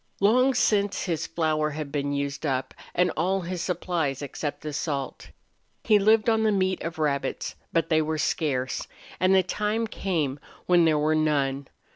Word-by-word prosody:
Long 255 +6 +4
since 205 -4 +2
his 170 -4 -2
flour 155 -2 0
had 150 -1 -5
been 145 -1 -1
used 140 0 -3
up, 130 -3 -1 0.2
and 180 +1 +3
all 190 +4 +1
his 175 0 -4
supplies 165 -6 -2
except 145 +1 -4
the 150 0 -5
salt. 140 -3 -4 0.5
He 215 -3 +5
lived 215 +2 +4
on 225 -1 +3
the 220 -1 +3
meat 185 -2 0
of 165 +1 -5
rabbits, 140 -3 -1 0.2
but 165 - +1
they 160 -1 +4
were 155 0 -1
scarce, 135 -5 -1 0.3
and 185 +1 +4
the 190 - +5
time 210 +4 -1
came 160 -10 -2 0.3
when 175 -2 +5
there 155 -2 +3
were 155 +1 +2
none. 140 -3 0
160 Hz, 170 wpm, -26 LUFS, 145-190 Hz, 0.5 s, He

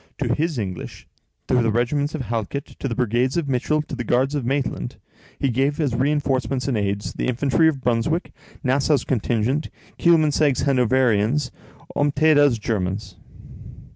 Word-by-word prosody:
To 120 -4 0
his 155 +2 -1
English, 95 -5 -5 0.4
to - - -1
the 115 - +1
regiments 140 +7 0
of 145 - -3
Halkett, 115 +4 -4
to - - -2
the 115 - -3
brigades 125 +3 +1
of 165 -4 -1
Mitchell, 140 +4 0
to 150 - -7
the 120 - -4
guards 130 +5 +1
of 145 -3 -1
Maitland, 130 - -2 0.4
he 135 - 0
gave 135 +5 0
as 145 -6 0
reinforcements 135 -1 0
and 135 - 0
aids, 100 -1 -2
the - - -3
infantry 135 +6 +2
of 145 -4 0
Brunswick, 125 +8 0 0.3
Nassau's 140 +2 +2
contingent, 125 +3 0 0.3
Kielmansegg's 155 -5 +3
Hanoverians, 130 -1 +2 0.4
and 145 0 +2
Ompteda's 145 -4 +4
Germans. 95 -2 -3
130 Hz, 150 wpm, -22 LUFS, 115-145 Hz, 0.4 s, Ompteda's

